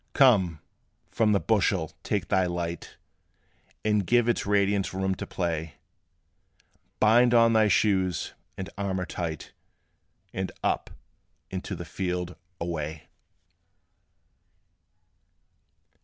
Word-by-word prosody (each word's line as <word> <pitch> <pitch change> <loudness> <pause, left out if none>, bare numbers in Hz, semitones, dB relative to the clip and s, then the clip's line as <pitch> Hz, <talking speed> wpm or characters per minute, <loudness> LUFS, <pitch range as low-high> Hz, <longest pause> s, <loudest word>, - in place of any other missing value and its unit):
Come! 95 - +4 0.5
from 110 -2 +2
the 100 - +4
bushel 95 -7 +1
take 100 -3 -2
thy 95 -1 +3
light, 85 -1 -4 0.9
And 105 -1 +2
give 120 +5 +3
its 120 -4 0
radiance 100 -1 +1
room 95 0 0
to - - -6
play; 80 -3 -3 1.2
Bind 120 +3 +5
on 115 -1 +6
thy 110 -1 +5
shoes 95 -4 +1 0.2
and 95 - -4
armor 95 -2 -1
tight, 85 -4 -5 0.8
And 95 0 -3
up, - - 0 0.6
and - - -4
to - - -4
the - - -7
field 90 -1 -3 0.2
away! 80 -2 -4
95 Hz, 105 wpm, -27 LUFS, 85-105 Hz, 1.2 s, on